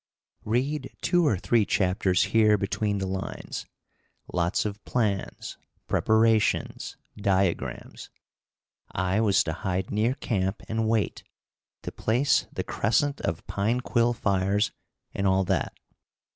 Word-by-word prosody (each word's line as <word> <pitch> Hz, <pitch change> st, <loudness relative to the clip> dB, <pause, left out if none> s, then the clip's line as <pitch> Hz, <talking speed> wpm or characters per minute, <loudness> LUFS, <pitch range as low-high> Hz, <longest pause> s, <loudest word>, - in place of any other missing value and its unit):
Read 130 Hz, +5 st, -1 dB
two 175 Hz, -2 st, +3 dB
or 105 Hz, -, +2 dB
three 110 Hz, +3 st, +2 dB
chapters 95 Hz, -2 st, +2 dB
here 110 Hz, -2 st, +5 dB
between 100 Hz, +1 st, -1 dB
the 95 Hz, -, -2 dB
lines 95 Hz, 0 st, -5 dB, 0.7 s
lots 90 Hz, +3 st, +1 dB
of 105 Hz, 0 st, -4 dB
plans, 105 Hz, -5 st, -2 dB, 0.3 s
preparations, 110 Hz, 0 st, +1 dB, 0.2 s
diagrams. 100 Hz, -3 st, -1 dB, 0.8 s
I 95 Hz, +3 st, +1 dB
was 100 Hz, -3 st, +4 dB
to -, -, -3 dB
hide 95 Hz, -2 st, -2 dB
near 110 Hz, +5 st, +1 dB
camp 95 Hz, -6 st, -2 dB
and 110 Hz, 0 st, 0 dB
wait 110 Hz, -2 st, 0 dB, 0.6 s
to -, -, -5 dB
place 125 Hz, +6 st, +1 dB
the -, -, -3 dB
crescent 140 Hz, +7 st, 0 dB
of 80 Hz, -, -3 dB
pine 110 Hz, +5 st, 0 dB
quill 120 Hz, -1 st, +2 dB
fires 100 Hz, -1 st, +1 dB, 0.4 s
and 100 Hz, -, 0 dB
all 95 Hz, 0 st, +3 dB
that. 90 Hz, -, -1 dB
105 Hz, 120 wpm, -27 LUFS, 95-115 Hz, 0.8 s, here